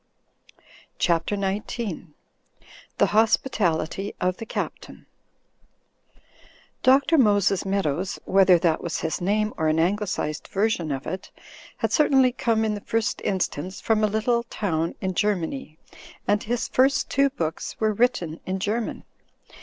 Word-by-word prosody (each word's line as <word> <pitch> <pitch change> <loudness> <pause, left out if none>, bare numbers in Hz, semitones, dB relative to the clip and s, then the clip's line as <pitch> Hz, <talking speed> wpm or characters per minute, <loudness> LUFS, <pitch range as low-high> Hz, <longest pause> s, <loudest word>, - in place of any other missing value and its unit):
CHAPTER 170 +3 +1
XIX 200 0 -3 0.9
THE - - +5
HOSPITALITY 200 -4 +1
OF 180 0 0
THE 225 - -8
CAPTAIN - - -5 1.8
DiL 265 +1 +6 0.2
Moses 205 -5 +3
Meadows, 190 -2 -1
whether 190 -1 +5
that 165 -2 +1
was 170 - -3
his 160 +1 -2
name 210 +3 +1
or 160 - 0
an 155 +1 +2
Anglicised 180 -4 -1
version 195 -6 0
of 135 -1 -4
it, 185 +3 -5 0.5
had - - -1
certainly 270 -4 +4
come 230 -3 0
in 215 - 0
the 205 - -5
first 225 +1 -1
instance 185 -1 -2
from 220 -1 +1
a - - +5
little 220 +3 +1
town 170 -8 -2
in 190 -1 -1
Germany 195 - -2 0.5
and 205 0 +2
his 240 +2 -2
first 275 +2 +2
two 275 0 +3
books 165 -10 -4
were 215 -1 +2
written 200 -8 0
in 190 +1 -1
German. 215 +4 -2
200 Hz, 130 wpm, -24 LUFS, 175-225 Hz, 1.8 s, DiL